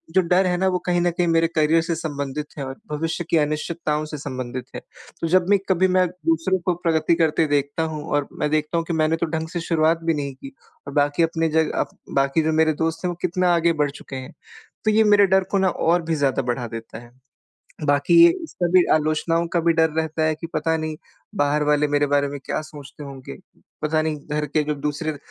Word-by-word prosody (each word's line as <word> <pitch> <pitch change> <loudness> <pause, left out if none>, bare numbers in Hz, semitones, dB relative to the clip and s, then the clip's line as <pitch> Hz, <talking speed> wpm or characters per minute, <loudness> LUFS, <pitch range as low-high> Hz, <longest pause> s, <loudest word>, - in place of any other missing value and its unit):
जो 190 - +6
डर 180 +2 +2
है 180 -1 +1
ना 190 +1 +1
वो 180 -1 +1
कहीं 175 -1 +2
न 175 0 +2
कहीं 175 +1 0
मेरे 165 0 +3
करियर 160 +1 +3
से 165 0 -2
संबंधित 145 -2 -4
है 140 - -4
और 130 0 -6 0.2
भविष्य 160 +3 -2
की 165 - +3
अनिश्चितताओं 155 0 -1
से 150 0 -7
संबंधित 130 -3 -5
है। - - -5 0.4
तो 165 - 0
जब 180 +2 +3
भी 205 - +6
कभी 185 0 +3
मैं 185 0 +3 0.2
दूसरों 165 +4 +1
को 180 - +2
प्रगति 165 -1 +2
करते 165 -1 +2
देखता 145 +2 0
हूँ 150 -1 -5
और 145 -1 +1
मैं 150 - 0
देखता 155 +2 0
हूँ 165 - -1
कि 170 - -2
मैंने 160 0 +2
तो - - +3
ढंग 160 0 -4
से 175 - -4
शुरुआत 165 0 +2
भी 165 0 +1
नहीं 140 -2 -3
की 135 +1 -11 0.3
और 140 - -6
बाकी 145 +2 +2
अपने 165 0 0
जगह 160 0 +1
अ, - - 0 0.2
बाकी 135 +3 +1
जो 160 - +1
मेरे 160 0 +3
दोस्त 165 +3 -2
हैं - - +1
वो 175 - -4
कितना 180 0 +1
आगे 170 0 +2
बढ़ 145 - -1
चुके 140 - -10
हैं। 130 -1 -7 0.5
तो 215 - +4
ये 220 +1 +4
मेरे 205 -1 +5
डर 190 0 +3
को 200 - +2
ना 190 -1 +3
और 175 0 +1
भी 165 0 -1
ज़्यादा 140 -2 +1
बढ़ा 120 0 -2
देता 115 0 -8
है। 120 0 -15 0.7
बाकी 145 -1 +2
ये 340 0 +7
सभी 180 - +2
आलोचनाओं 155 +2 +1
का 175 - +3
भी 165 0 +3
डर 160 0 +3
रहता 160 0 -1
है 155 0 +1
कि 165 +2 -7
पता 160 0 0
नहीं 155 -1 -4 0.4
बाहर 150 -3 +1
वाले 150 0 +2
मेरे 145 0 +2
बारे 145 0 +2
में 140 0 -6
क्या - - -2
सोचते 150 -1 -11
होंगे? 135 - -9 0.5
पता 155 +1 +1
नहीं 155 -1 -2
घर 150 0 0
के 150 +2 0
जो 150 0 -2
दूसरे 150 +2 -3
160 Hz, 230 wpm, -22 LUFS, 145-170 Hz, 0.7 s, ये